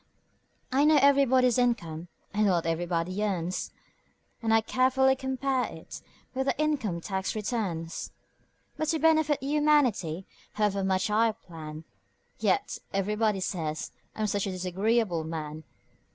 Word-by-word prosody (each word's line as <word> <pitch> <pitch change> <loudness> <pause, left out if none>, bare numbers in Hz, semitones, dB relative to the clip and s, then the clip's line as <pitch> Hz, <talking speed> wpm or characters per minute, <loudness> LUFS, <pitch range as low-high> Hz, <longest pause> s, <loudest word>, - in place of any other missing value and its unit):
I 270 +2 +3
know 305 0 +6
everybody's 260 -3 +4
income 175 -10 0 0.3
and 210 +1 +2
what 175 -4 +2
everybody 170 +3 -1
earns, 185 -3 -2 0.7
And 225 -1 0
I 225 0 +5
carefully 260 +3 +3
compare 265 0 -1
it - - -9 0.3
with 265 +1 -1
the - - 0
income 265 - 0
tax 190 +2 -3
returns; 200 -7 -3 0.7
But 310 0 -1
to 320 - +1
benefit 315 -2 +3
humanity, 270 - +2 0.3
however 205 -2 0
much 190 +1 +1
I 225 +2 +4
plan, 160 -5 -9 0.6
Yet 205 -4 0
everybody 210 +1 0
says 160 -4 -3 0.2
I'm 215 - -1
such 205 -1 0
a - - -2
disagreeable 185 0 0
man! 155 -1 -6
210 Hz, 125 wpm, -28 LUFS, 175-260 Hz, 0.7 s, know